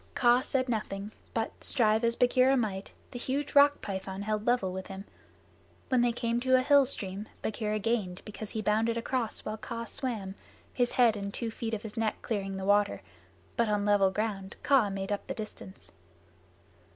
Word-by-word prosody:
Kaa 245 0 +5
said 260 0 -1
nothing, 210 -3 -3 0.2
but, 225 -1 -3
strive 220 -2 +2
as 235 0 +2
Bagheera 255 +2 +4
might, 200 -5 -2 0.2
the 245 - -6
huge 275 +4 -2
Rock 285 0 +6
python 190 0 -4
held 215 +1 -2
level 240 -7 +2
with 190 0 -5
him. 195 +1 -8 0.8
When 255 -2 +3
they 240 0 +3
came 235 0 -1
to 260 +1 +3
a 255 - +4
hill 280 -1 +5
stream, 200 -4 -4 0.2
Bagheera 215 -1 -1
gained, 210 -4 -1
because 210 0 -7
he 215 0 -3
bounded 225 +2 +2
across 235 -1 -2
while 215 +1 -3
Kaa 230 +1 -5
swam, 220 -7 -4 0.4
his 245 -1 +1
head 235 -3 +5
and 200 -1 -4
two 225 +2 -3
feet 225 0 -3
of 205 - -7
his 220 -1 -8
neck 225 -1 0
clearing 195 -3 -2
the 190 - -4
water, 205 0 +2 0.5
but 235 -3 +2
on 205 -1 +1
level 205 -2 +4
ground 195 -1 -3
Kaa 265 -7 +4
made 195 0 -4
up 205 - -2
the - - -3
distance. 215 -3 -9
220 Hz, 185 wpm, -30 LUFS, 200-240 Hz, 0.8 s, Rock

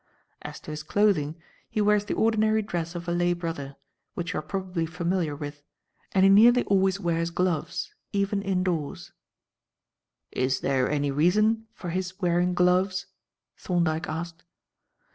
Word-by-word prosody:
As - - -8
to - - -8
his 155 0 -5
clothing, 160 -3 +1 0.3
he - - -2
wears 210 0 +3
the - - -2
ordinary 220 -1 +2
dress 170 -3 -4
of 175 0 -6
a - - 0
lay 175 0 +2
brother, 165 -5 -5 0.4
which 175 -1 -3
you - - -1
are - - -4
probably 180 0 -3
familiar 170 -2 -1
with, 145 0 -7 0.5
and 190 - +3
he 195 - +7
nearly 240 +5 +7
always 195 0 +2
wears 170 -2 0
gloves, 175 -2 -2 0.2
even 200 0 0
indoors." 180 -3 -2 1.2
"Is 130 +1 0
there 130 -2 +1
any 145 -1 0
reason 215 +9 +2
for 175 - -6
his 185 +2 -3
wearing 180 -1 +1
gloves?" 185 +1 +2 0.5
Thorndyke 170 -3 0
asked. 165 +1 -5
175 Hz, 145 wpm, -26 LUFS, 165-195 Hz, 1.2 s, he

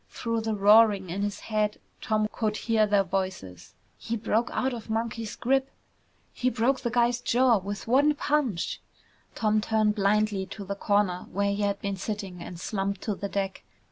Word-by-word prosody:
Through 230 -1 -2
the 220 -1 -1
roaring 205 -2 +5
in 195 +3 -3
his 205 0 -3
head, 210 -1 -1 0.2
Tom 215 -1 +1
could 215 -2 -1
hear 220 -2 +2
their 205 -1 +3
voices, 185 - -4 0.2
"He 230 - -3
broke 225 +2 0
out 260 0 0
of 230 -2 -8
Monkey's 225 0 -3
grip!" 270 +2 +1 0.6
"He 255 - 0
broke 255 +3 +1
the 240 - -1
guy's 240 0 +2
jaw 245 -1 +3
with 200 +2 -6
one 285 +5 +4
punch!" 285 - -1 0.5
Tom 215 -1 +2
turned 215 -1 +2
blindly 205 -1 +1
to 200 +1 -8
the 200 - -3
corner 200 -2 0
where 200 +1 0
he 205 - -3
had 200 -1 0
been 200 -1 -3
sitting 195 -3 -5
and 170 0 -8
slumped 195 0 -2
to 215 - -2
the 200 0 -5
deck. 195 -1 -3
210 Hz, 175 wpm, -27 LUFS, 200-230 Hz, 0.6 s, roaring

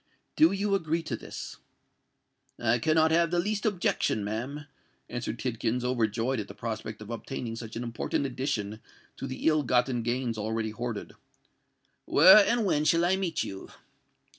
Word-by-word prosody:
Do 160 +3 +6
you 200 +1 0
agree 165 -3 0
to 130 - -3
this?" - - -8 1.0
"I 120 +1 +2
cannot 160 +4 +3
have 170 +1 +3
the 175 - 0
least 210 +5 0
objection, 175 - 0
ma'am," 125 +8 -4 0.4
answered 120 -1 -4
Tidkins, 120 0 -2
overjoyed 120 0 0
at 105 - -4
the 100 - -10
prospect 110 -1 -5
of 105 - -9
obtaining 115 0 -5
such 115 -1 -8
an 115 - -3
important 120 +4 -2
addition 125 -6 -3 0.4
to - - -5
the 130 - -6
ill 155 -1 +4
gotten 125 -1 +1
gains 120 -1 -2
already 110 +1 -2
hoarded. 115 -1 -5 0.9
"Where 190 +7 +8
and 235 +1 +1
when 150 -6 +2
shall 165 +2 +3
I 185 +2 +3
meet 190 -3 -1
you?" 95 0 -7
125 Hz, 160 wpm, -28 LUFS, 115-160 Hz, 1.0 s, Where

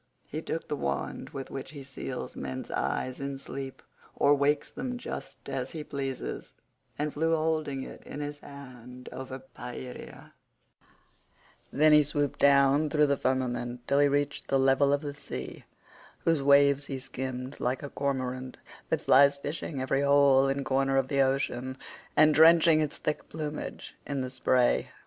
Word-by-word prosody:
He 155 - -5
took 165 - -4
the 150 - -2
wand 70 - -3
with 135 -1 -7
which 135 +2 -7
he 140 -2 -8
seals 135 0 -6
men's 65 -1 -5
eyes 130 0 -2
in 140 0 -4
sleep 135 0 -7 0.3
or 145 - +4
wakes 145 +1 +1
them 250 -1 -4
just - - -8
as - - -3
he 155 -2 -5
pleases, 135 -3 -5 0.4
and 150 0 -2
flew 165 +2 +1
holding 155 -4 -1
it - - -10
in - - -8
his 145 0 -5
hand 125 -3 -11
over 130 0 -6
Pieria; 125 -1 -9 1.4
then 155 +2 +5
he 150 - +8
swooped 145 -1 -1
down 140 +2 +5
through 150 0 +3
the 140 -1 +2
firmament 125 -2 -2
till 140 - +3
he 145 - +6
reached 145 +1 -1
the 135 - +2
level 135 +1 +4
of 145 0 +2
the 145 -2 -5
sea, 105 - -7 0.6
whose 165 -3 +2
waves 140 0 +4
he 135 - -3
skimmed 130 0 -6
like 125 +4 -1
a 140 - -5
cormorant 130 -2 -3 0.3
that - - 0
flies 140 +2 +5
fishing 145 0 -5
every 130 +1 0
hole 140 -1 +5
and 135 0 -1
corner 135 0 +1
of 135 -1 +1
the 140 -1 +2
ocean, 130 -1 0 0.4
and 155 0 +6
drenching 160 +1 +6
its 150 -1 -2
thick 150 - -3
plumage 150 -1 -6
in 140 -2 -2
the 130 0 -4
spray. 125 -1 +2
140 Hz, 165 wpm, -29 LUFS, 130-145 Hz, 1.4 s, he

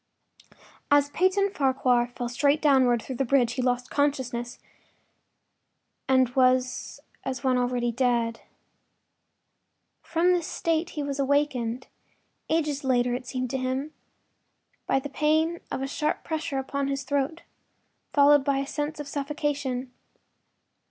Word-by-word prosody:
III - - -25 0.3
As 285 0 +4
Peyton 380 +4 +2
Farquhar 260 -5 +2
fell 245 0 -5
straight 280 +5 +2
downward 260 -6 +3
through 260 - -6
the 270 - +1
bridge 245 -2 +2
he 255 - -2
lost 250 0 -1
consciousness 260 -4 -1 1.5
and 260 -2 +4
was 255 0 +1 0.2
as 260 0 -4
one 260 -1 +2
already 245 -1 0
dead. 235 -2 0 1.6
From 345 +2 +1
this 350 -3 +1
state 330 +1 -1
he 295 - -1
was 280 -1 -4
awakened—ages 285 +2 -2
later, 245 -2 +2
it 250 0 -4
seemed 255 -2 -3
to 265 - -1
him—by 265 +1 -5
the 270 - -6
pain 315 +4 +1
of 265 - -3
a - - -2
sharp 300 +2 -2
pressure 315 -3 -3
upon 275 +1 -2
his 275 0 -2
throat, 285 +4 -2 0.7
followed 290 0 +5
by 275 0 +1
a 275 - -1
sense 295 +2 -4
of 295 - -6
suffocation. 280 -3 -3
270 Hz, 130 wpm, -26 LUFS, 250-295 Hz, 1.6 s, followed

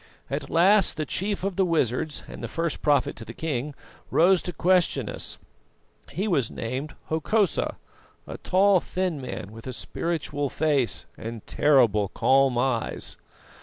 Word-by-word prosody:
At - - -3
last 190 +3 +4
the 155 - -1
chief 195 +5 -2
of 195 -2 -2
the 195 - +4
wizards 155 -3 0
and - - -9
the - - -2
first 165 -1 -2
prophet 145 -3 +2
to 115 - -7
the 115 +1 -10
king 145 -2 -3 0.3
rose 180 +2 +4
to 180 - -4
question 175 - +2
us. - - -5 0.7
He 195 +4 -2
was 140 - +1
named 130 +6 -5
Hokosa, 185 +5 +1 0.5
a - - -8
tall, 195 0 +4
thin 180 -5 -2
man, 105 -5 -6
with 115 +3 -11
a 130 - -4
spiritual 145 0 -2
face 140 -4 0
and 115 -1 -7
terrible 120 -9 +3
calm 135 +4 +3
eyes. 120 -2 -1
150 Hz, 150 wpm, -26 LUFS, 125-180 Hz, 0.7 s, last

